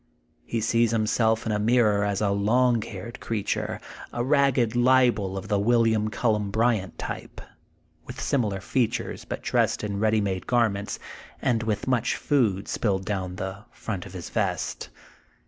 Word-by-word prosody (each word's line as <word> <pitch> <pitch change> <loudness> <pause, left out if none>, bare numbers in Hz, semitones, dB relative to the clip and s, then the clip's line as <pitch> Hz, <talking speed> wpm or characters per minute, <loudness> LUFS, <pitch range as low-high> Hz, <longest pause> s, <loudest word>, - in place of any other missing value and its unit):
He 115 - -1
sees 115 +1 +2
himself 110 0 +1
in 110 - -1
a 105 - 0
mirror 105 -2 +3
as 100 -1 -1
a 100 -2 +2
long 115 +4 +3
haired 105 +3 -7
creature, 110 -3 -2 0.3
a 120 - -2
ragged 135 -4 +2
libel 120 -6 +3
of 95 +1 -6
the 105 -1 +1
William 110 -1 +3
CuUen 105 -2 0
Bryant 110 -5 +1
type, - - -6 0.7
with - - -8
similar 105 -8 0
features, 120 +3 -1
but - - -5
dressed - - +1
in 100 -1 -2
ready 110 +1 +3
made 95 -3 -2
garments, 110 -5 +1 0.4
and 120 -4 +1
with 110 -2 -2
much 130 -3 +1
food 110 -10 +1
spilled 95 -4 -1
down 95 -4 -3
the 95 +2 -5
front 100 -5 -5
of 95 - -13
his 90 -2 -7
vest. - - -2
110 Hz, 155 wpm, -26 LUFS, 100-120 Hz, 0.7 s, mirror